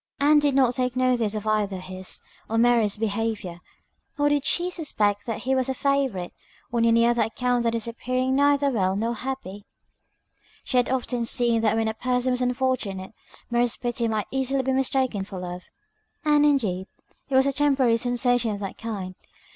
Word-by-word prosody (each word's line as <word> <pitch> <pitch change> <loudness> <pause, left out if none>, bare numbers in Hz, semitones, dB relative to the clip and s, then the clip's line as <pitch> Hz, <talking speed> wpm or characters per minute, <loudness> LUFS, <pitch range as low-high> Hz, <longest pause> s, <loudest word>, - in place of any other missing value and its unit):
Ann 295 +1 +5
did 290 -2 +1
not 260 -3 +4
take 250 0 -1
notice 250 -4 +1
of 215 0 -4
either 210 -3 0
his 185 0 -4 0.3
or 225 - 0
Mary's 230 -3 +3
behaviour, 215 -4 -2 0.6
nor 290 0 +3
did 290 -1 +1
she 355 +1 +1
suspect 210 - -1
that 225 - -3
he 265 - +1
was 260 0 +1
a 265 - -1
favourite, 265 -11 -1 0.4
on 230 -1 +2
any 230 0 +4
other 240 0 +2
account 245 +2 0
than 230 -1 0
his 230 -1 -2
appearing 255 +3 -1
neither 285 0 +3
well 190 -5 +1
nor 225 +4 -1
happy. 235 -5 -6 1.0
She 255 - -1
had 245 - +3
often 250 -2 -1
seen 235 -1 +3
that 220 -1 +2
when 225 0 +1
a 220 - -1
person 250 +2 0
was 250 0 -1
unfortunate, 245 -6 -1 0.4
Mary's 240 0 +1
pity 240 -1 -1
might 215 -2 -1
easily 265 0 0
be 265 +1 0
mistaken 260 -5 0
for 195 -1 -8
love, 180 0 -6 0.6
and, 295 -1 +4
indeed, 205 -10 0 0.4
it 270 - -1
was 265 0 +5
a 275 - +1
temporary 270 -5 +3
sensation 245 0 +1
of 205 -1 -3
that 195 -2 -6
kind. 200 -5 -5
240 Hz, 180 wpm, -25 LUFS, 215-265 Hz, 1.0 s, Ann